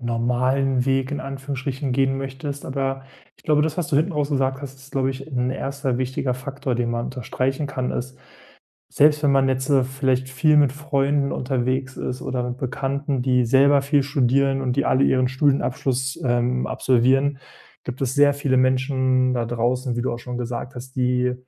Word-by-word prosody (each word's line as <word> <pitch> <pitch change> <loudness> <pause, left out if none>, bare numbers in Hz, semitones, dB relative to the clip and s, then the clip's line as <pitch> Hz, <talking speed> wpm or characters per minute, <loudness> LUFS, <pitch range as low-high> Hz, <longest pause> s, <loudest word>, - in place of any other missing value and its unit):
normalen 125 +2 +1
Weg 135 0 +1
in 145 - -3
Anführungsstrichen 135 0 -4
gehen 135 0 +1
möchtest. 135 +1 -5
Aber 135 0 -2 0.3
ich - - -26
glaube, 150 -1 +3
das, 155 -1 -1
was 165 - -1
du 140 - +1
hinten 160 +5 +1
raus 150 -1 -1
gesagt 135 0 0
hast, 135 -1 -7
ist, 135 +1 -16
glaube 135 -1 +1
ich, 135 +1 -8
'n 125 -1 0
1. 135 -1 -2
wichtiger 130 0 -1
Faktor, 135 0 -4
den 120 0 -1
man 120 0 -2
unterstreichen 130 +3 -2
kann 130 -2 -3
ist 130 +1 -5 0.7
selbst 150 +1 +4
wenn 140 - +4
man 135 -1 +3
jetzt, 130 +1 -1
ne, 135 -2 +4
vielleicht 130 0 -1
viel 150 +3 +3
mit 140 -3 +4
Freunden 140 -1 0
unterwegs 130 0 -2
ist 125 0 -4
oder 125 -1 -2
mit 125 +1 -5
Bekannten, 135 +1 -2
die 125 -1 +2
selber 135 +3 +4
viel 140 0 +2
studieren 135 0 +2
und 125 -1 -1
die 140 - +2
alle 130 - +2
ihren 130 -2 +3
Studienabschluss, 130 -1 0
ähm, 125 +1 +1
absolvieren, 130 +3 +2 0.4
gibt 125 0 -7
es 130 -1 -1
sehr 145 0 +5
viele 140 -2 0
Menschen 130 0 +2
da 120 -1 -1
draußen, 120 +2 -1
wie 120 - -1
du 125 - -1
auch 120 - -5
schon 125 0 -6
gesagt 125 +2 -5
hast, 130 +1 -9
die 125 -1 +1
130 Hz, 185 wpm, -22 LUFS, 125-140 Hz, 0.7 s, sehr